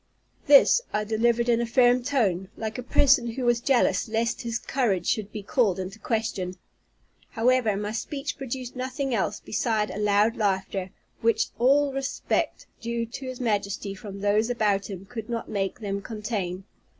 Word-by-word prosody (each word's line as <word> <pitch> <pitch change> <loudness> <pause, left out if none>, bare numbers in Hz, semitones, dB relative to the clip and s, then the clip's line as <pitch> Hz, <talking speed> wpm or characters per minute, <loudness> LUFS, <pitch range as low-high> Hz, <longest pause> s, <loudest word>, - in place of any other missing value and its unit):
This 290 - +7
I 210 - 0
delivered 235 +2 +1
in 235 -1 +3
a - - 0
firm 245 0 +4
tone, 210 -9 0
like 220 +1 -4
a - - -2
person 250 -1 +3
who 255 +1 -3
was 240 0 +3
jealous 240 -8 +2
lest 230 +1 0
his 235 -2 -2
courage 210 -12 0
should 210 -2 -1
be 210 -1 -6
called 205 -3 +2
in 185 0 -4
question. 205 -4 -3 0.7
However, 230 -3 +2
my 210 +1 -3
speech 275 +6 -4
produced 260 -2 -6
nothing 260 +1 -3
else 210 -1 0
beside 215 -1 -1
a 210 - -5
loud 210 +2 +3
laughter, 190 -2 -1 0.3
which 225 -1 +2
all 280 +4 +4
the 270 - -5
respect 275 0 -2 0.2
due 235 0 -2
to 260 +3 -8
his 255 -1 -6
Majesty 205 -4 -1
from 195 0 -9
those 210 +3 +2
about 210 -5 +1
him 195 -1 -7
could 225 +1 -7
not 230 -1 -3
make 200 +3 -2
them 200 -1 -3
contain. 205 -4 -4
225 Hz, 170 wpm, -26 LUFS, 200-245 Hz, 0.7 s, This